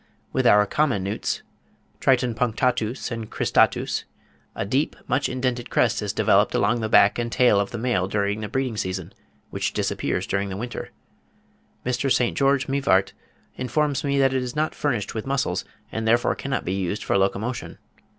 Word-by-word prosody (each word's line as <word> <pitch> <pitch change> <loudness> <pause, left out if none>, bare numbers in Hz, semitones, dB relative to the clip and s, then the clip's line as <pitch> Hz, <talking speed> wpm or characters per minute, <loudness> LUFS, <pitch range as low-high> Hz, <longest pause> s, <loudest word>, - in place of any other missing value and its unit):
With - - +2
our 105 0 +6
common 130 -5 +1
newts 100 +2 -2 0.6
(Triton 125 -3 +2
punctatus 120 +1 -1
and 115 -2 -5
cristatus) - - +1 0.5
a - - -2
deep, 130 +9 0
much 135 +3 +1
indented 125 -1 -2
crest 115 -3 +2
is 105 -1 -2
developed - - +3
along 120 -1 +2
the 110 - -2
back 100 +1 +5
and 120 0 -2
tail 120 -5 +4
of 100 - -1
the 120 - -5
male 115 -6 0
during 100 +1 -1
the 105 - -4
breeding 130 -4 -2
season, 95 -3 -3 0.4
which - - -2
disappears - - -1
during 100 0 -1
the 95 - -5
winter. 120 +3 -5 1.0
Mr. 125 +2 0
St. 120 -2 +2
George 140 -1 +2
Mivart 135 -9 +2 0.4
informs 140 +2 0
me 140 -1 0
that 135 -1 +3
it 130 - +1
is 125 +1 -5
not 155 +1 0
furnished 120 -9 -2
with 110 +3 -5
muscles, 135 -1 -1 0.3
and 110 0 -3
therefore 120 +2 +3
cannot 135 -2 -3
be 90 - -1
used 95 +1 -2
for - - 0
locomotion. 100 +5 -1
120 Hz, 170 wpm, -24 LUFS, 105-130 Hz, 1.0 s, our